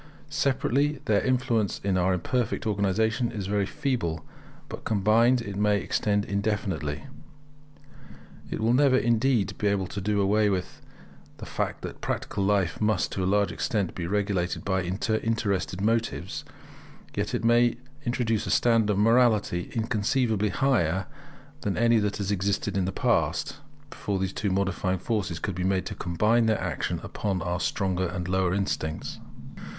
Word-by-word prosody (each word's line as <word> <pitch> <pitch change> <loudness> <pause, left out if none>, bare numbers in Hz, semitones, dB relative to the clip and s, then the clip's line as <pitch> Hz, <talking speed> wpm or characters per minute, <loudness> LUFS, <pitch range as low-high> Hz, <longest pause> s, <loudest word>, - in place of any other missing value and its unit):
Separately, 140 0 +1
their 105 -2 +3
influence 120 -5 0
in 100 -1 +1
our 95 +1 +2
imperfect 110 +8 -1
organization 110 +4 +1
is 100 -3 -4
very 100 0 0
feeble; 115 - -2 0.4
but - - -8
combined 115 +4 +3
it 100 -2 -6
may 105 0 +3
extend 105 0 0
indefinitely. 100 - -2 1.5
It - - -3
will 115 +2 +3
never, 130 0 +5
indeed, 120 -3 +2
be 105 - +1
able 100 -2 +1
to 100 +2 -5
do 105 +1 0
away 105 +2 +3
with 95 -2 -3 0.6
the - - -8
fact - - -3
that - - -7
practical 100 - -2
life 95 -5 +1
must, 105 -2 +1
to 95 - -2
a 90 - +1
large 100 -2 +2
extent, 100 -6 -1
be 85 -2 -4
regulated 100 -3 -1
by 95 -1 +1
interested 100 0 -1
motives; 115 +2 -1 0.7
yet - - -1
it - - -2
may 120 +1 +4 0.3
introduce 120 -4 0
a - - -2
standard 115 -3 +3
of 100 - 0
morality 110 -5 +3
inconceivably 110 -1 +1
higher 95 - +1 0.6
than 100 - -2
any 115 0 +4
that 105 -1 -1
has 100 0 -2
existed 100 0 -1
in 95 -2 +1
the 95 - -1
past, - - 0 0.3
before 100 -1 -3
these 95 0 -2
two 105 - -1
modifying 95 -1 0
forces 95 -3 -2
could 100 - -3
be 90 +1 -3
made 95 0 +1
to - - -4
combine 110 +7 +2
their 110 -1 +2
action 90 -7 -2
upon 95 -4 -2
our 90 -1 -2
stronger 95 -1 0
and 90 0 -4
lower 95 -1 +1
instincts. 85 -5 -3
100 Hz, 155 wpm, -27 LUFS, 95-115 Hz, 1.5 s, never